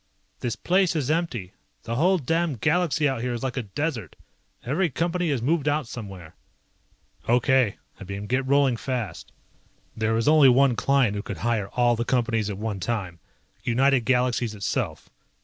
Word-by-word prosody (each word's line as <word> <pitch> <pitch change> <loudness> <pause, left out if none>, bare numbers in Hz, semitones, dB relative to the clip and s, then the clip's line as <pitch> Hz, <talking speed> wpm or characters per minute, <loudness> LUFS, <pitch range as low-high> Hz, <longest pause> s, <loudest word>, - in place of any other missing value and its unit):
"This 120 -2 -2
place 185 -1 +1
is 150 -2 0
empty. 140 - -2 0.3
The 115 - -4
whole 180 +10 +3
damned 165 -2 -1
galaxy 160 - +2
out 135 -4 -2
here 125 0 -2
is 120 - -5
like 130 -2 -2
a 130 - -1
desert. 115 - -4 0.5
Every 160 +8 +1
Company 170 +3 -1
has 135 -5 -1
moved 150 +2 +1
out 145 -3 0
somewhere." 95 -9 -9 1.0
"Okay," 125 -2 +3 0.2
I - - -8
beamed, 100 +2 -6
"get 130 +1 0
rolling 140 -3 +3
fast." 125 -4 -4 0.6
There 110 0 0
was 115 +3 0
only 150 -3 +7
one 130 0 +4
client 135 -3 +2
who 100 - -2
could 100 - -6
hire 110 -4 0
all 120 -1 +3
the 115 - -1
Companies 115 -4 0
at 100 - -4
one 105 -1 -3
time. 95 -6 -3 0.4
United 135 +3 +3
Galaxies 125 -3 +1
itself. 100 - -3
125 Hz, 165 wpm, -25 LUFS, 115-145 Hz, 1.0 s, only